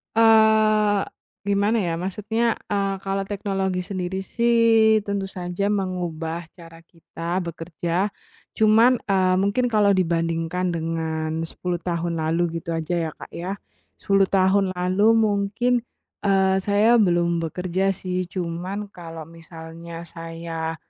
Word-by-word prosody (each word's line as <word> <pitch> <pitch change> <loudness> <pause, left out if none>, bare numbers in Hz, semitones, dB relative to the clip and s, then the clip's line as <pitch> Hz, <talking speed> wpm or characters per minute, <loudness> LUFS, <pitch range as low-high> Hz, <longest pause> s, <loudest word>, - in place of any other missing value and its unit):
Eee, 220 -2 +5 0.4
gimana, 205 +3 +1
ya? 170 -2 -1
Maksudnya, 215 +6 -1 0.2
eee, 200 -1 0
kalau 195 0 -2
teknologi 195 -2 -2
sendiri 185 0 -4
sih, 225 -1 +3
tentu 200 -1 -3
saja 190 +2 -2
mengubah 170 -4 -3
cara 165 -1 -14
kita 170 +2 -5
bekerja. 170 +3 -3 0.4
Cuman, 225 +3 +4
eee, 185 -1 +3
mungkin 200 +6 +1
kalau 215 -4 +3
dibandingkan 170 -1 0
dengan 160 -1 -2
10 175 +1 -4
tahun 170 -1 -2
lalu 165 +1 0
gitu 170 - -9
aja 160 +2 -3 0.2
ya, - - -10
Kak, - - -11
ya. 185 +4 -4 0.4
10 195 -1 +3
tahun 190 0 +3
lalu 185 +3 +1
mungkin, 215 +3 +1 0.5
eee, 190 -1 +3
saya 210 +4 +4
belum 170 -2 +2
bekerja 180 +3 -1
sih, 185 -1 -3
cuman 185 +3 -4
kalau 165 -2 -8
misalnya 165 0 -10
saya 165 -1 -5
185 Hz, 120 wpm, -23 LUFS, 170-200 Hz, 0.5 s, Eee